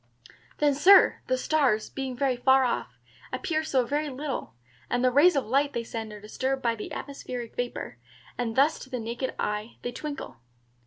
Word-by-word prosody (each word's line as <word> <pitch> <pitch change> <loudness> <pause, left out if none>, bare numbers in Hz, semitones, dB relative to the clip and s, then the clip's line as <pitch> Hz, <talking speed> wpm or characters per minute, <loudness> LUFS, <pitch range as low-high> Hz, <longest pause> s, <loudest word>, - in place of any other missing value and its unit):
"Then, 295 -1 +3
Sir, 370 +8 +6
the 255 - +1
stars, 255 -6 +1
being 265 -2 -4
so - - -16
very 265 -2 +2
far 265 +2 +4
off, 245 - -2 0.3
appear 315 -2 -1
so 265 -5 +1
very 295 +4 -1
little, 275 - -5 0.3
and 245 0 0
the 255 - +4
rays 295 +7 +6
of 275 - +1
light 280 +5 +1
they 235 - -2
send 225 -1 -6
are 210 - -9
disturbed 260 +6 -3
by 230 -1 +2 0.2
atmospheric 250 -4 -6
vapor, 245 0 -4 0.4
and 230 -2 -2
thus 285 +4 +3
to 260 - -10
the 250 -2 -3
naked 235 +3 -4
eye 210 +2 -3
they 245 - -2
twinkle." 285 - -6
260 Hz, 180 wpm, -27 LUFS, 235-285 Hz, 0.4 s, Sir